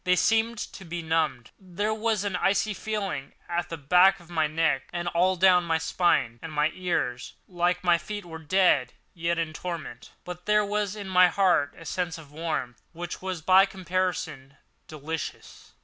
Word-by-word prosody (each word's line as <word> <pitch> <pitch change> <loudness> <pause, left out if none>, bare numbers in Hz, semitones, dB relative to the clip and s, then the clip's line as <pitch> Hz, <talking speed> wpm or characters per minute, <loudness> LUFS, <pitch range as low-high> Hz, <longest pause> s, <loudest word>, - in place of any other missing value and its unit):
They 180 0 +3
seemed 225 +4 +2
to 195 - -7
be 170 -1 -5
numbed. 155 -7 -1
There 200 +3 -2
was 220 -2 0
an 200 -3 -2
icy 200 +3 +1
feeling 200 -10 -4
at 175 0 -2
the 165 - -5
back 180 +6 +5
of 175 -1 -17
my 160 -2 +1
neck 155 -3 0
and 175 0 -3
all 180 +2 +2
down 180 -1 +5
my 165 -1 +1
spine, 160 -8 +1
and 160 - -7
my 150 +1 +1
ears, 125 -9 -2
like 180 +1 0
my 175 -1 +4
feet, 205 +3 -6
were 160 -1 -8
dead, 160 -6 +2 0.2
yet 170 0 -1
in 165 -2 -2
torment; 165 -7 -6 0.2
but 180 +1 -8
there 210 0 +4
was 205 0 -1
in 205 -2 -7
my 180 -1 +5
breast 175 -8 +2
a 165 - -12
sense 175 +1 -2
of 150 -3 -13
warmth 150 -6 -4
which 175 +1 -6
was, 185 -4 -4
by 190 +3 +6
comparison, 180 -7 -3 0.3
delicious. 155 +1 -7
175 Hz, 180 wpm, -26 LUFS, 160-190 Hz, 0.3 s, by